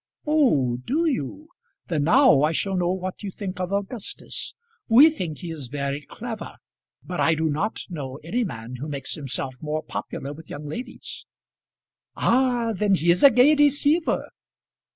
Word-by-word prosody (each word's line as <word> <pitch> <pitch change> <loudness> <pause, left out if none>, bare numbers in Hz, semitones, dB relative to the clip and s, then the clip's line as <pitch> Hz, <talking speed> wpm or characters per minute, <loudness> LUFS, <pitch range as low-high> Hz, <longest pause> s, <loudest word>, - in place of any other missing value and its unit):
"Oh, 240 - +3
do 285 - -1
you? 300 - -2 0.4
Then 155 -4 0
now 245 - +6
I 155 +2 +2
shall 195 +4 -1
know 175 -1 +1
what 185 0 -4
you 205 - -4
think 185 -1 -6
of 180 0 -2
Augustus. 200 +2 -4 0.3
We 275 +8 +8
think 175 - -4
he 175 -3 -6
is 150 -5 -6
very 140 +2 -3
clever; 225 +7 -7 0.5
but 180 -1 -5
I 165 - +3
do 160 0 0
not 155 +9 -2
know 140 -7 -6
any 230 +10 -1
man 125 - -6
who 140 +5 -6
makes 140 -3 -5
himself 135 -2 -4
more 155 +1 -2
popular 140 +1 -5
with 160 +1 -13
young 145 +1 -7
ladies." 245 - -7 0.9
"Ah, 245 -2 +2
then 200 0 +2
he 170 0 +3
is 180 - +2
a 280 - +10
gay 255 +4 +6
deceiver." 295 +2 +3
180 Hz, 165 wpm, -24 LUFS, 150-245 Hz, 0.9 s, a